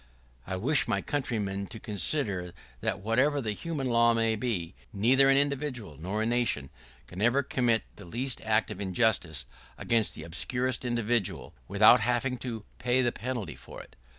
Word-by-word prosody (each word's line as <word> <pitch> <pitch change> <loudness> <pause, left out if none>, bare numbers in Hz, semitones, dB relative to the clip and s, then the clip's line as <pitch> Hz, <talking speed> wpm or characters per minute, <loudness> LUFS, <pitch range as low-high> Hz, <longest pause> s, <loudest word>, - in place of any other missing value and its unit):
[¶16] - - -8
I - - 0
wish 135 +11 +3
my - - +1
countrymen 105 -8 -2
to 110 - -9
consider, 100 - -1 0.3
that 105 -3 -2
whatever 130 +8 +2
the 110 -5 -2
human 150 +5 -4
law 115 -1 +4
may 115 -1 +2
be, 105 -7 -3 0.2
neither 130 +7 +4
an 135 - +5
individual 140 - -1
nor 100 +6 -2
a - - 0
nation 115 - 0 0.3
can 90 +2 -8
ever 120 +5 +3
commit 120 -4 +1
the 100 - -11
least 120 +8 -3
act 110 0 +1
of 95 - -6
injustice 95 - +1 0.3
against 115 -3 +1
the 80 - -8
obscurest 125 +10 -1
individual 115 -6 -1
without 105 +5 +6
having 125 +3 0
to 115 -4 -6
pay 125 +1 +2
the 120 - +2
penalty 120 -8 -5
for - - -11
it. - - -13
115 Hz, 170 wpm, -29 LUFS, 100-125 Hz, 0.3 s, without